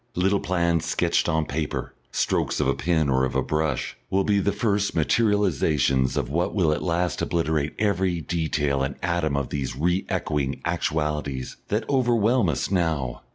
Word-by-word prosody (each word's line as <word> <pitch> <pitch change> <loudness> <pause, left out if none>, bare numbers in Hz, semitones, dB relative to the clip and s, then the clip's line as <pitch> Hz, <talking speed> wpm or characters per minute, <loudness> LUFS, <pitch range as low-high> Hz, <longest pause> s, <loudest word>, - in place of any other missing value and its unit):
Little 95 +3 +2
plans 85 -2 0
sketched - - +1
on 80 0 +1
paper, 75 +1 -3 0.2
strokes - - 0
of - - +1
a - - +3
pen 80 -3 +1
or 65 -1 +2
of 65 - -1
a - - +2
brush, 75 -3 -1
will 95 +1 +2
be 100 0 +2
the 100 +1 +1
first 100 0 0
materialisations 80 - +2
of - - 0
what 85 +9 -1
will 85 -6 +3
at 75 - -1
last 85 -1 -1
obliterate 80 -3 0
every 95 -4 +1
detail 75 -4 -1
and 70 +1 -2
atom 85 -4 0
of 70 -3 -2
these 70 -4 -3
re 90 +6 0
echoing 70 -3 -1
actualities 75 -4 -2
that 110 +2 -1
overwhelm 120 - +2
us 75 - -2
now. 80 -9 0
80 Hz, 165 wpm, -24 LUFS, 75-95 Hz, 0.2 s, a